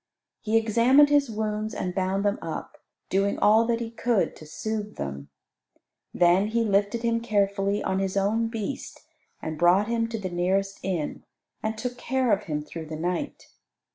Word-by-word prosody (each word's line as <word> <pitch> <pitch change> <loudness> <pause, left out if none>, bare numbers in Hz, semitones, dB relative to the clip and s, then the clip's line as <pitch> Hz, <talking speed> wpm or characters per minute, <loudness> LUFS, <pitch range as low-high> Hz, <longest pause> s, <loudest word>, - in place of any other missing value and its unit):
He 220 +1 +1
examined 235 +6 +5
his 290 -3 +3
wounds 215 0 -2
and 180 - -3
bound 190 +1 0
them 205 0 +1
up; 160 -1 -6 0.3
doing 195 +1 +1
all 220 +2 +5
that 235 -1 +1
he 230 -1 -4
could 230 -2 0
to 155 - -12
soothe 210 +5 -4
them. 70 0 -6 0.8
Then 180 +3 +4
he 230 +2 +1
lifted 205 +2 +1
him 230 0 +1
carefully 200 -2 0
on 190 - 0
his 195 0 -1
own 215 +4 +1
beast, 225 +2 -5 0.4
and 155 -1 -4
brought 180 +5 +4
him 230 0 0
to 230 0 -4
the 190 -4 -5
nearest 190 +3 0
inn, 175 -6 -3 0.4
and 220 0 -2
took 245 +2 -4
care 260 -2 0
of 200 - +1
him 150 -2 -3
through 160 +1 -8
the 155 - -5
night. 180 - -3
205 Hz, 170 wpm, -26 LUFS, 185-230 Hz, 0.8 s, examined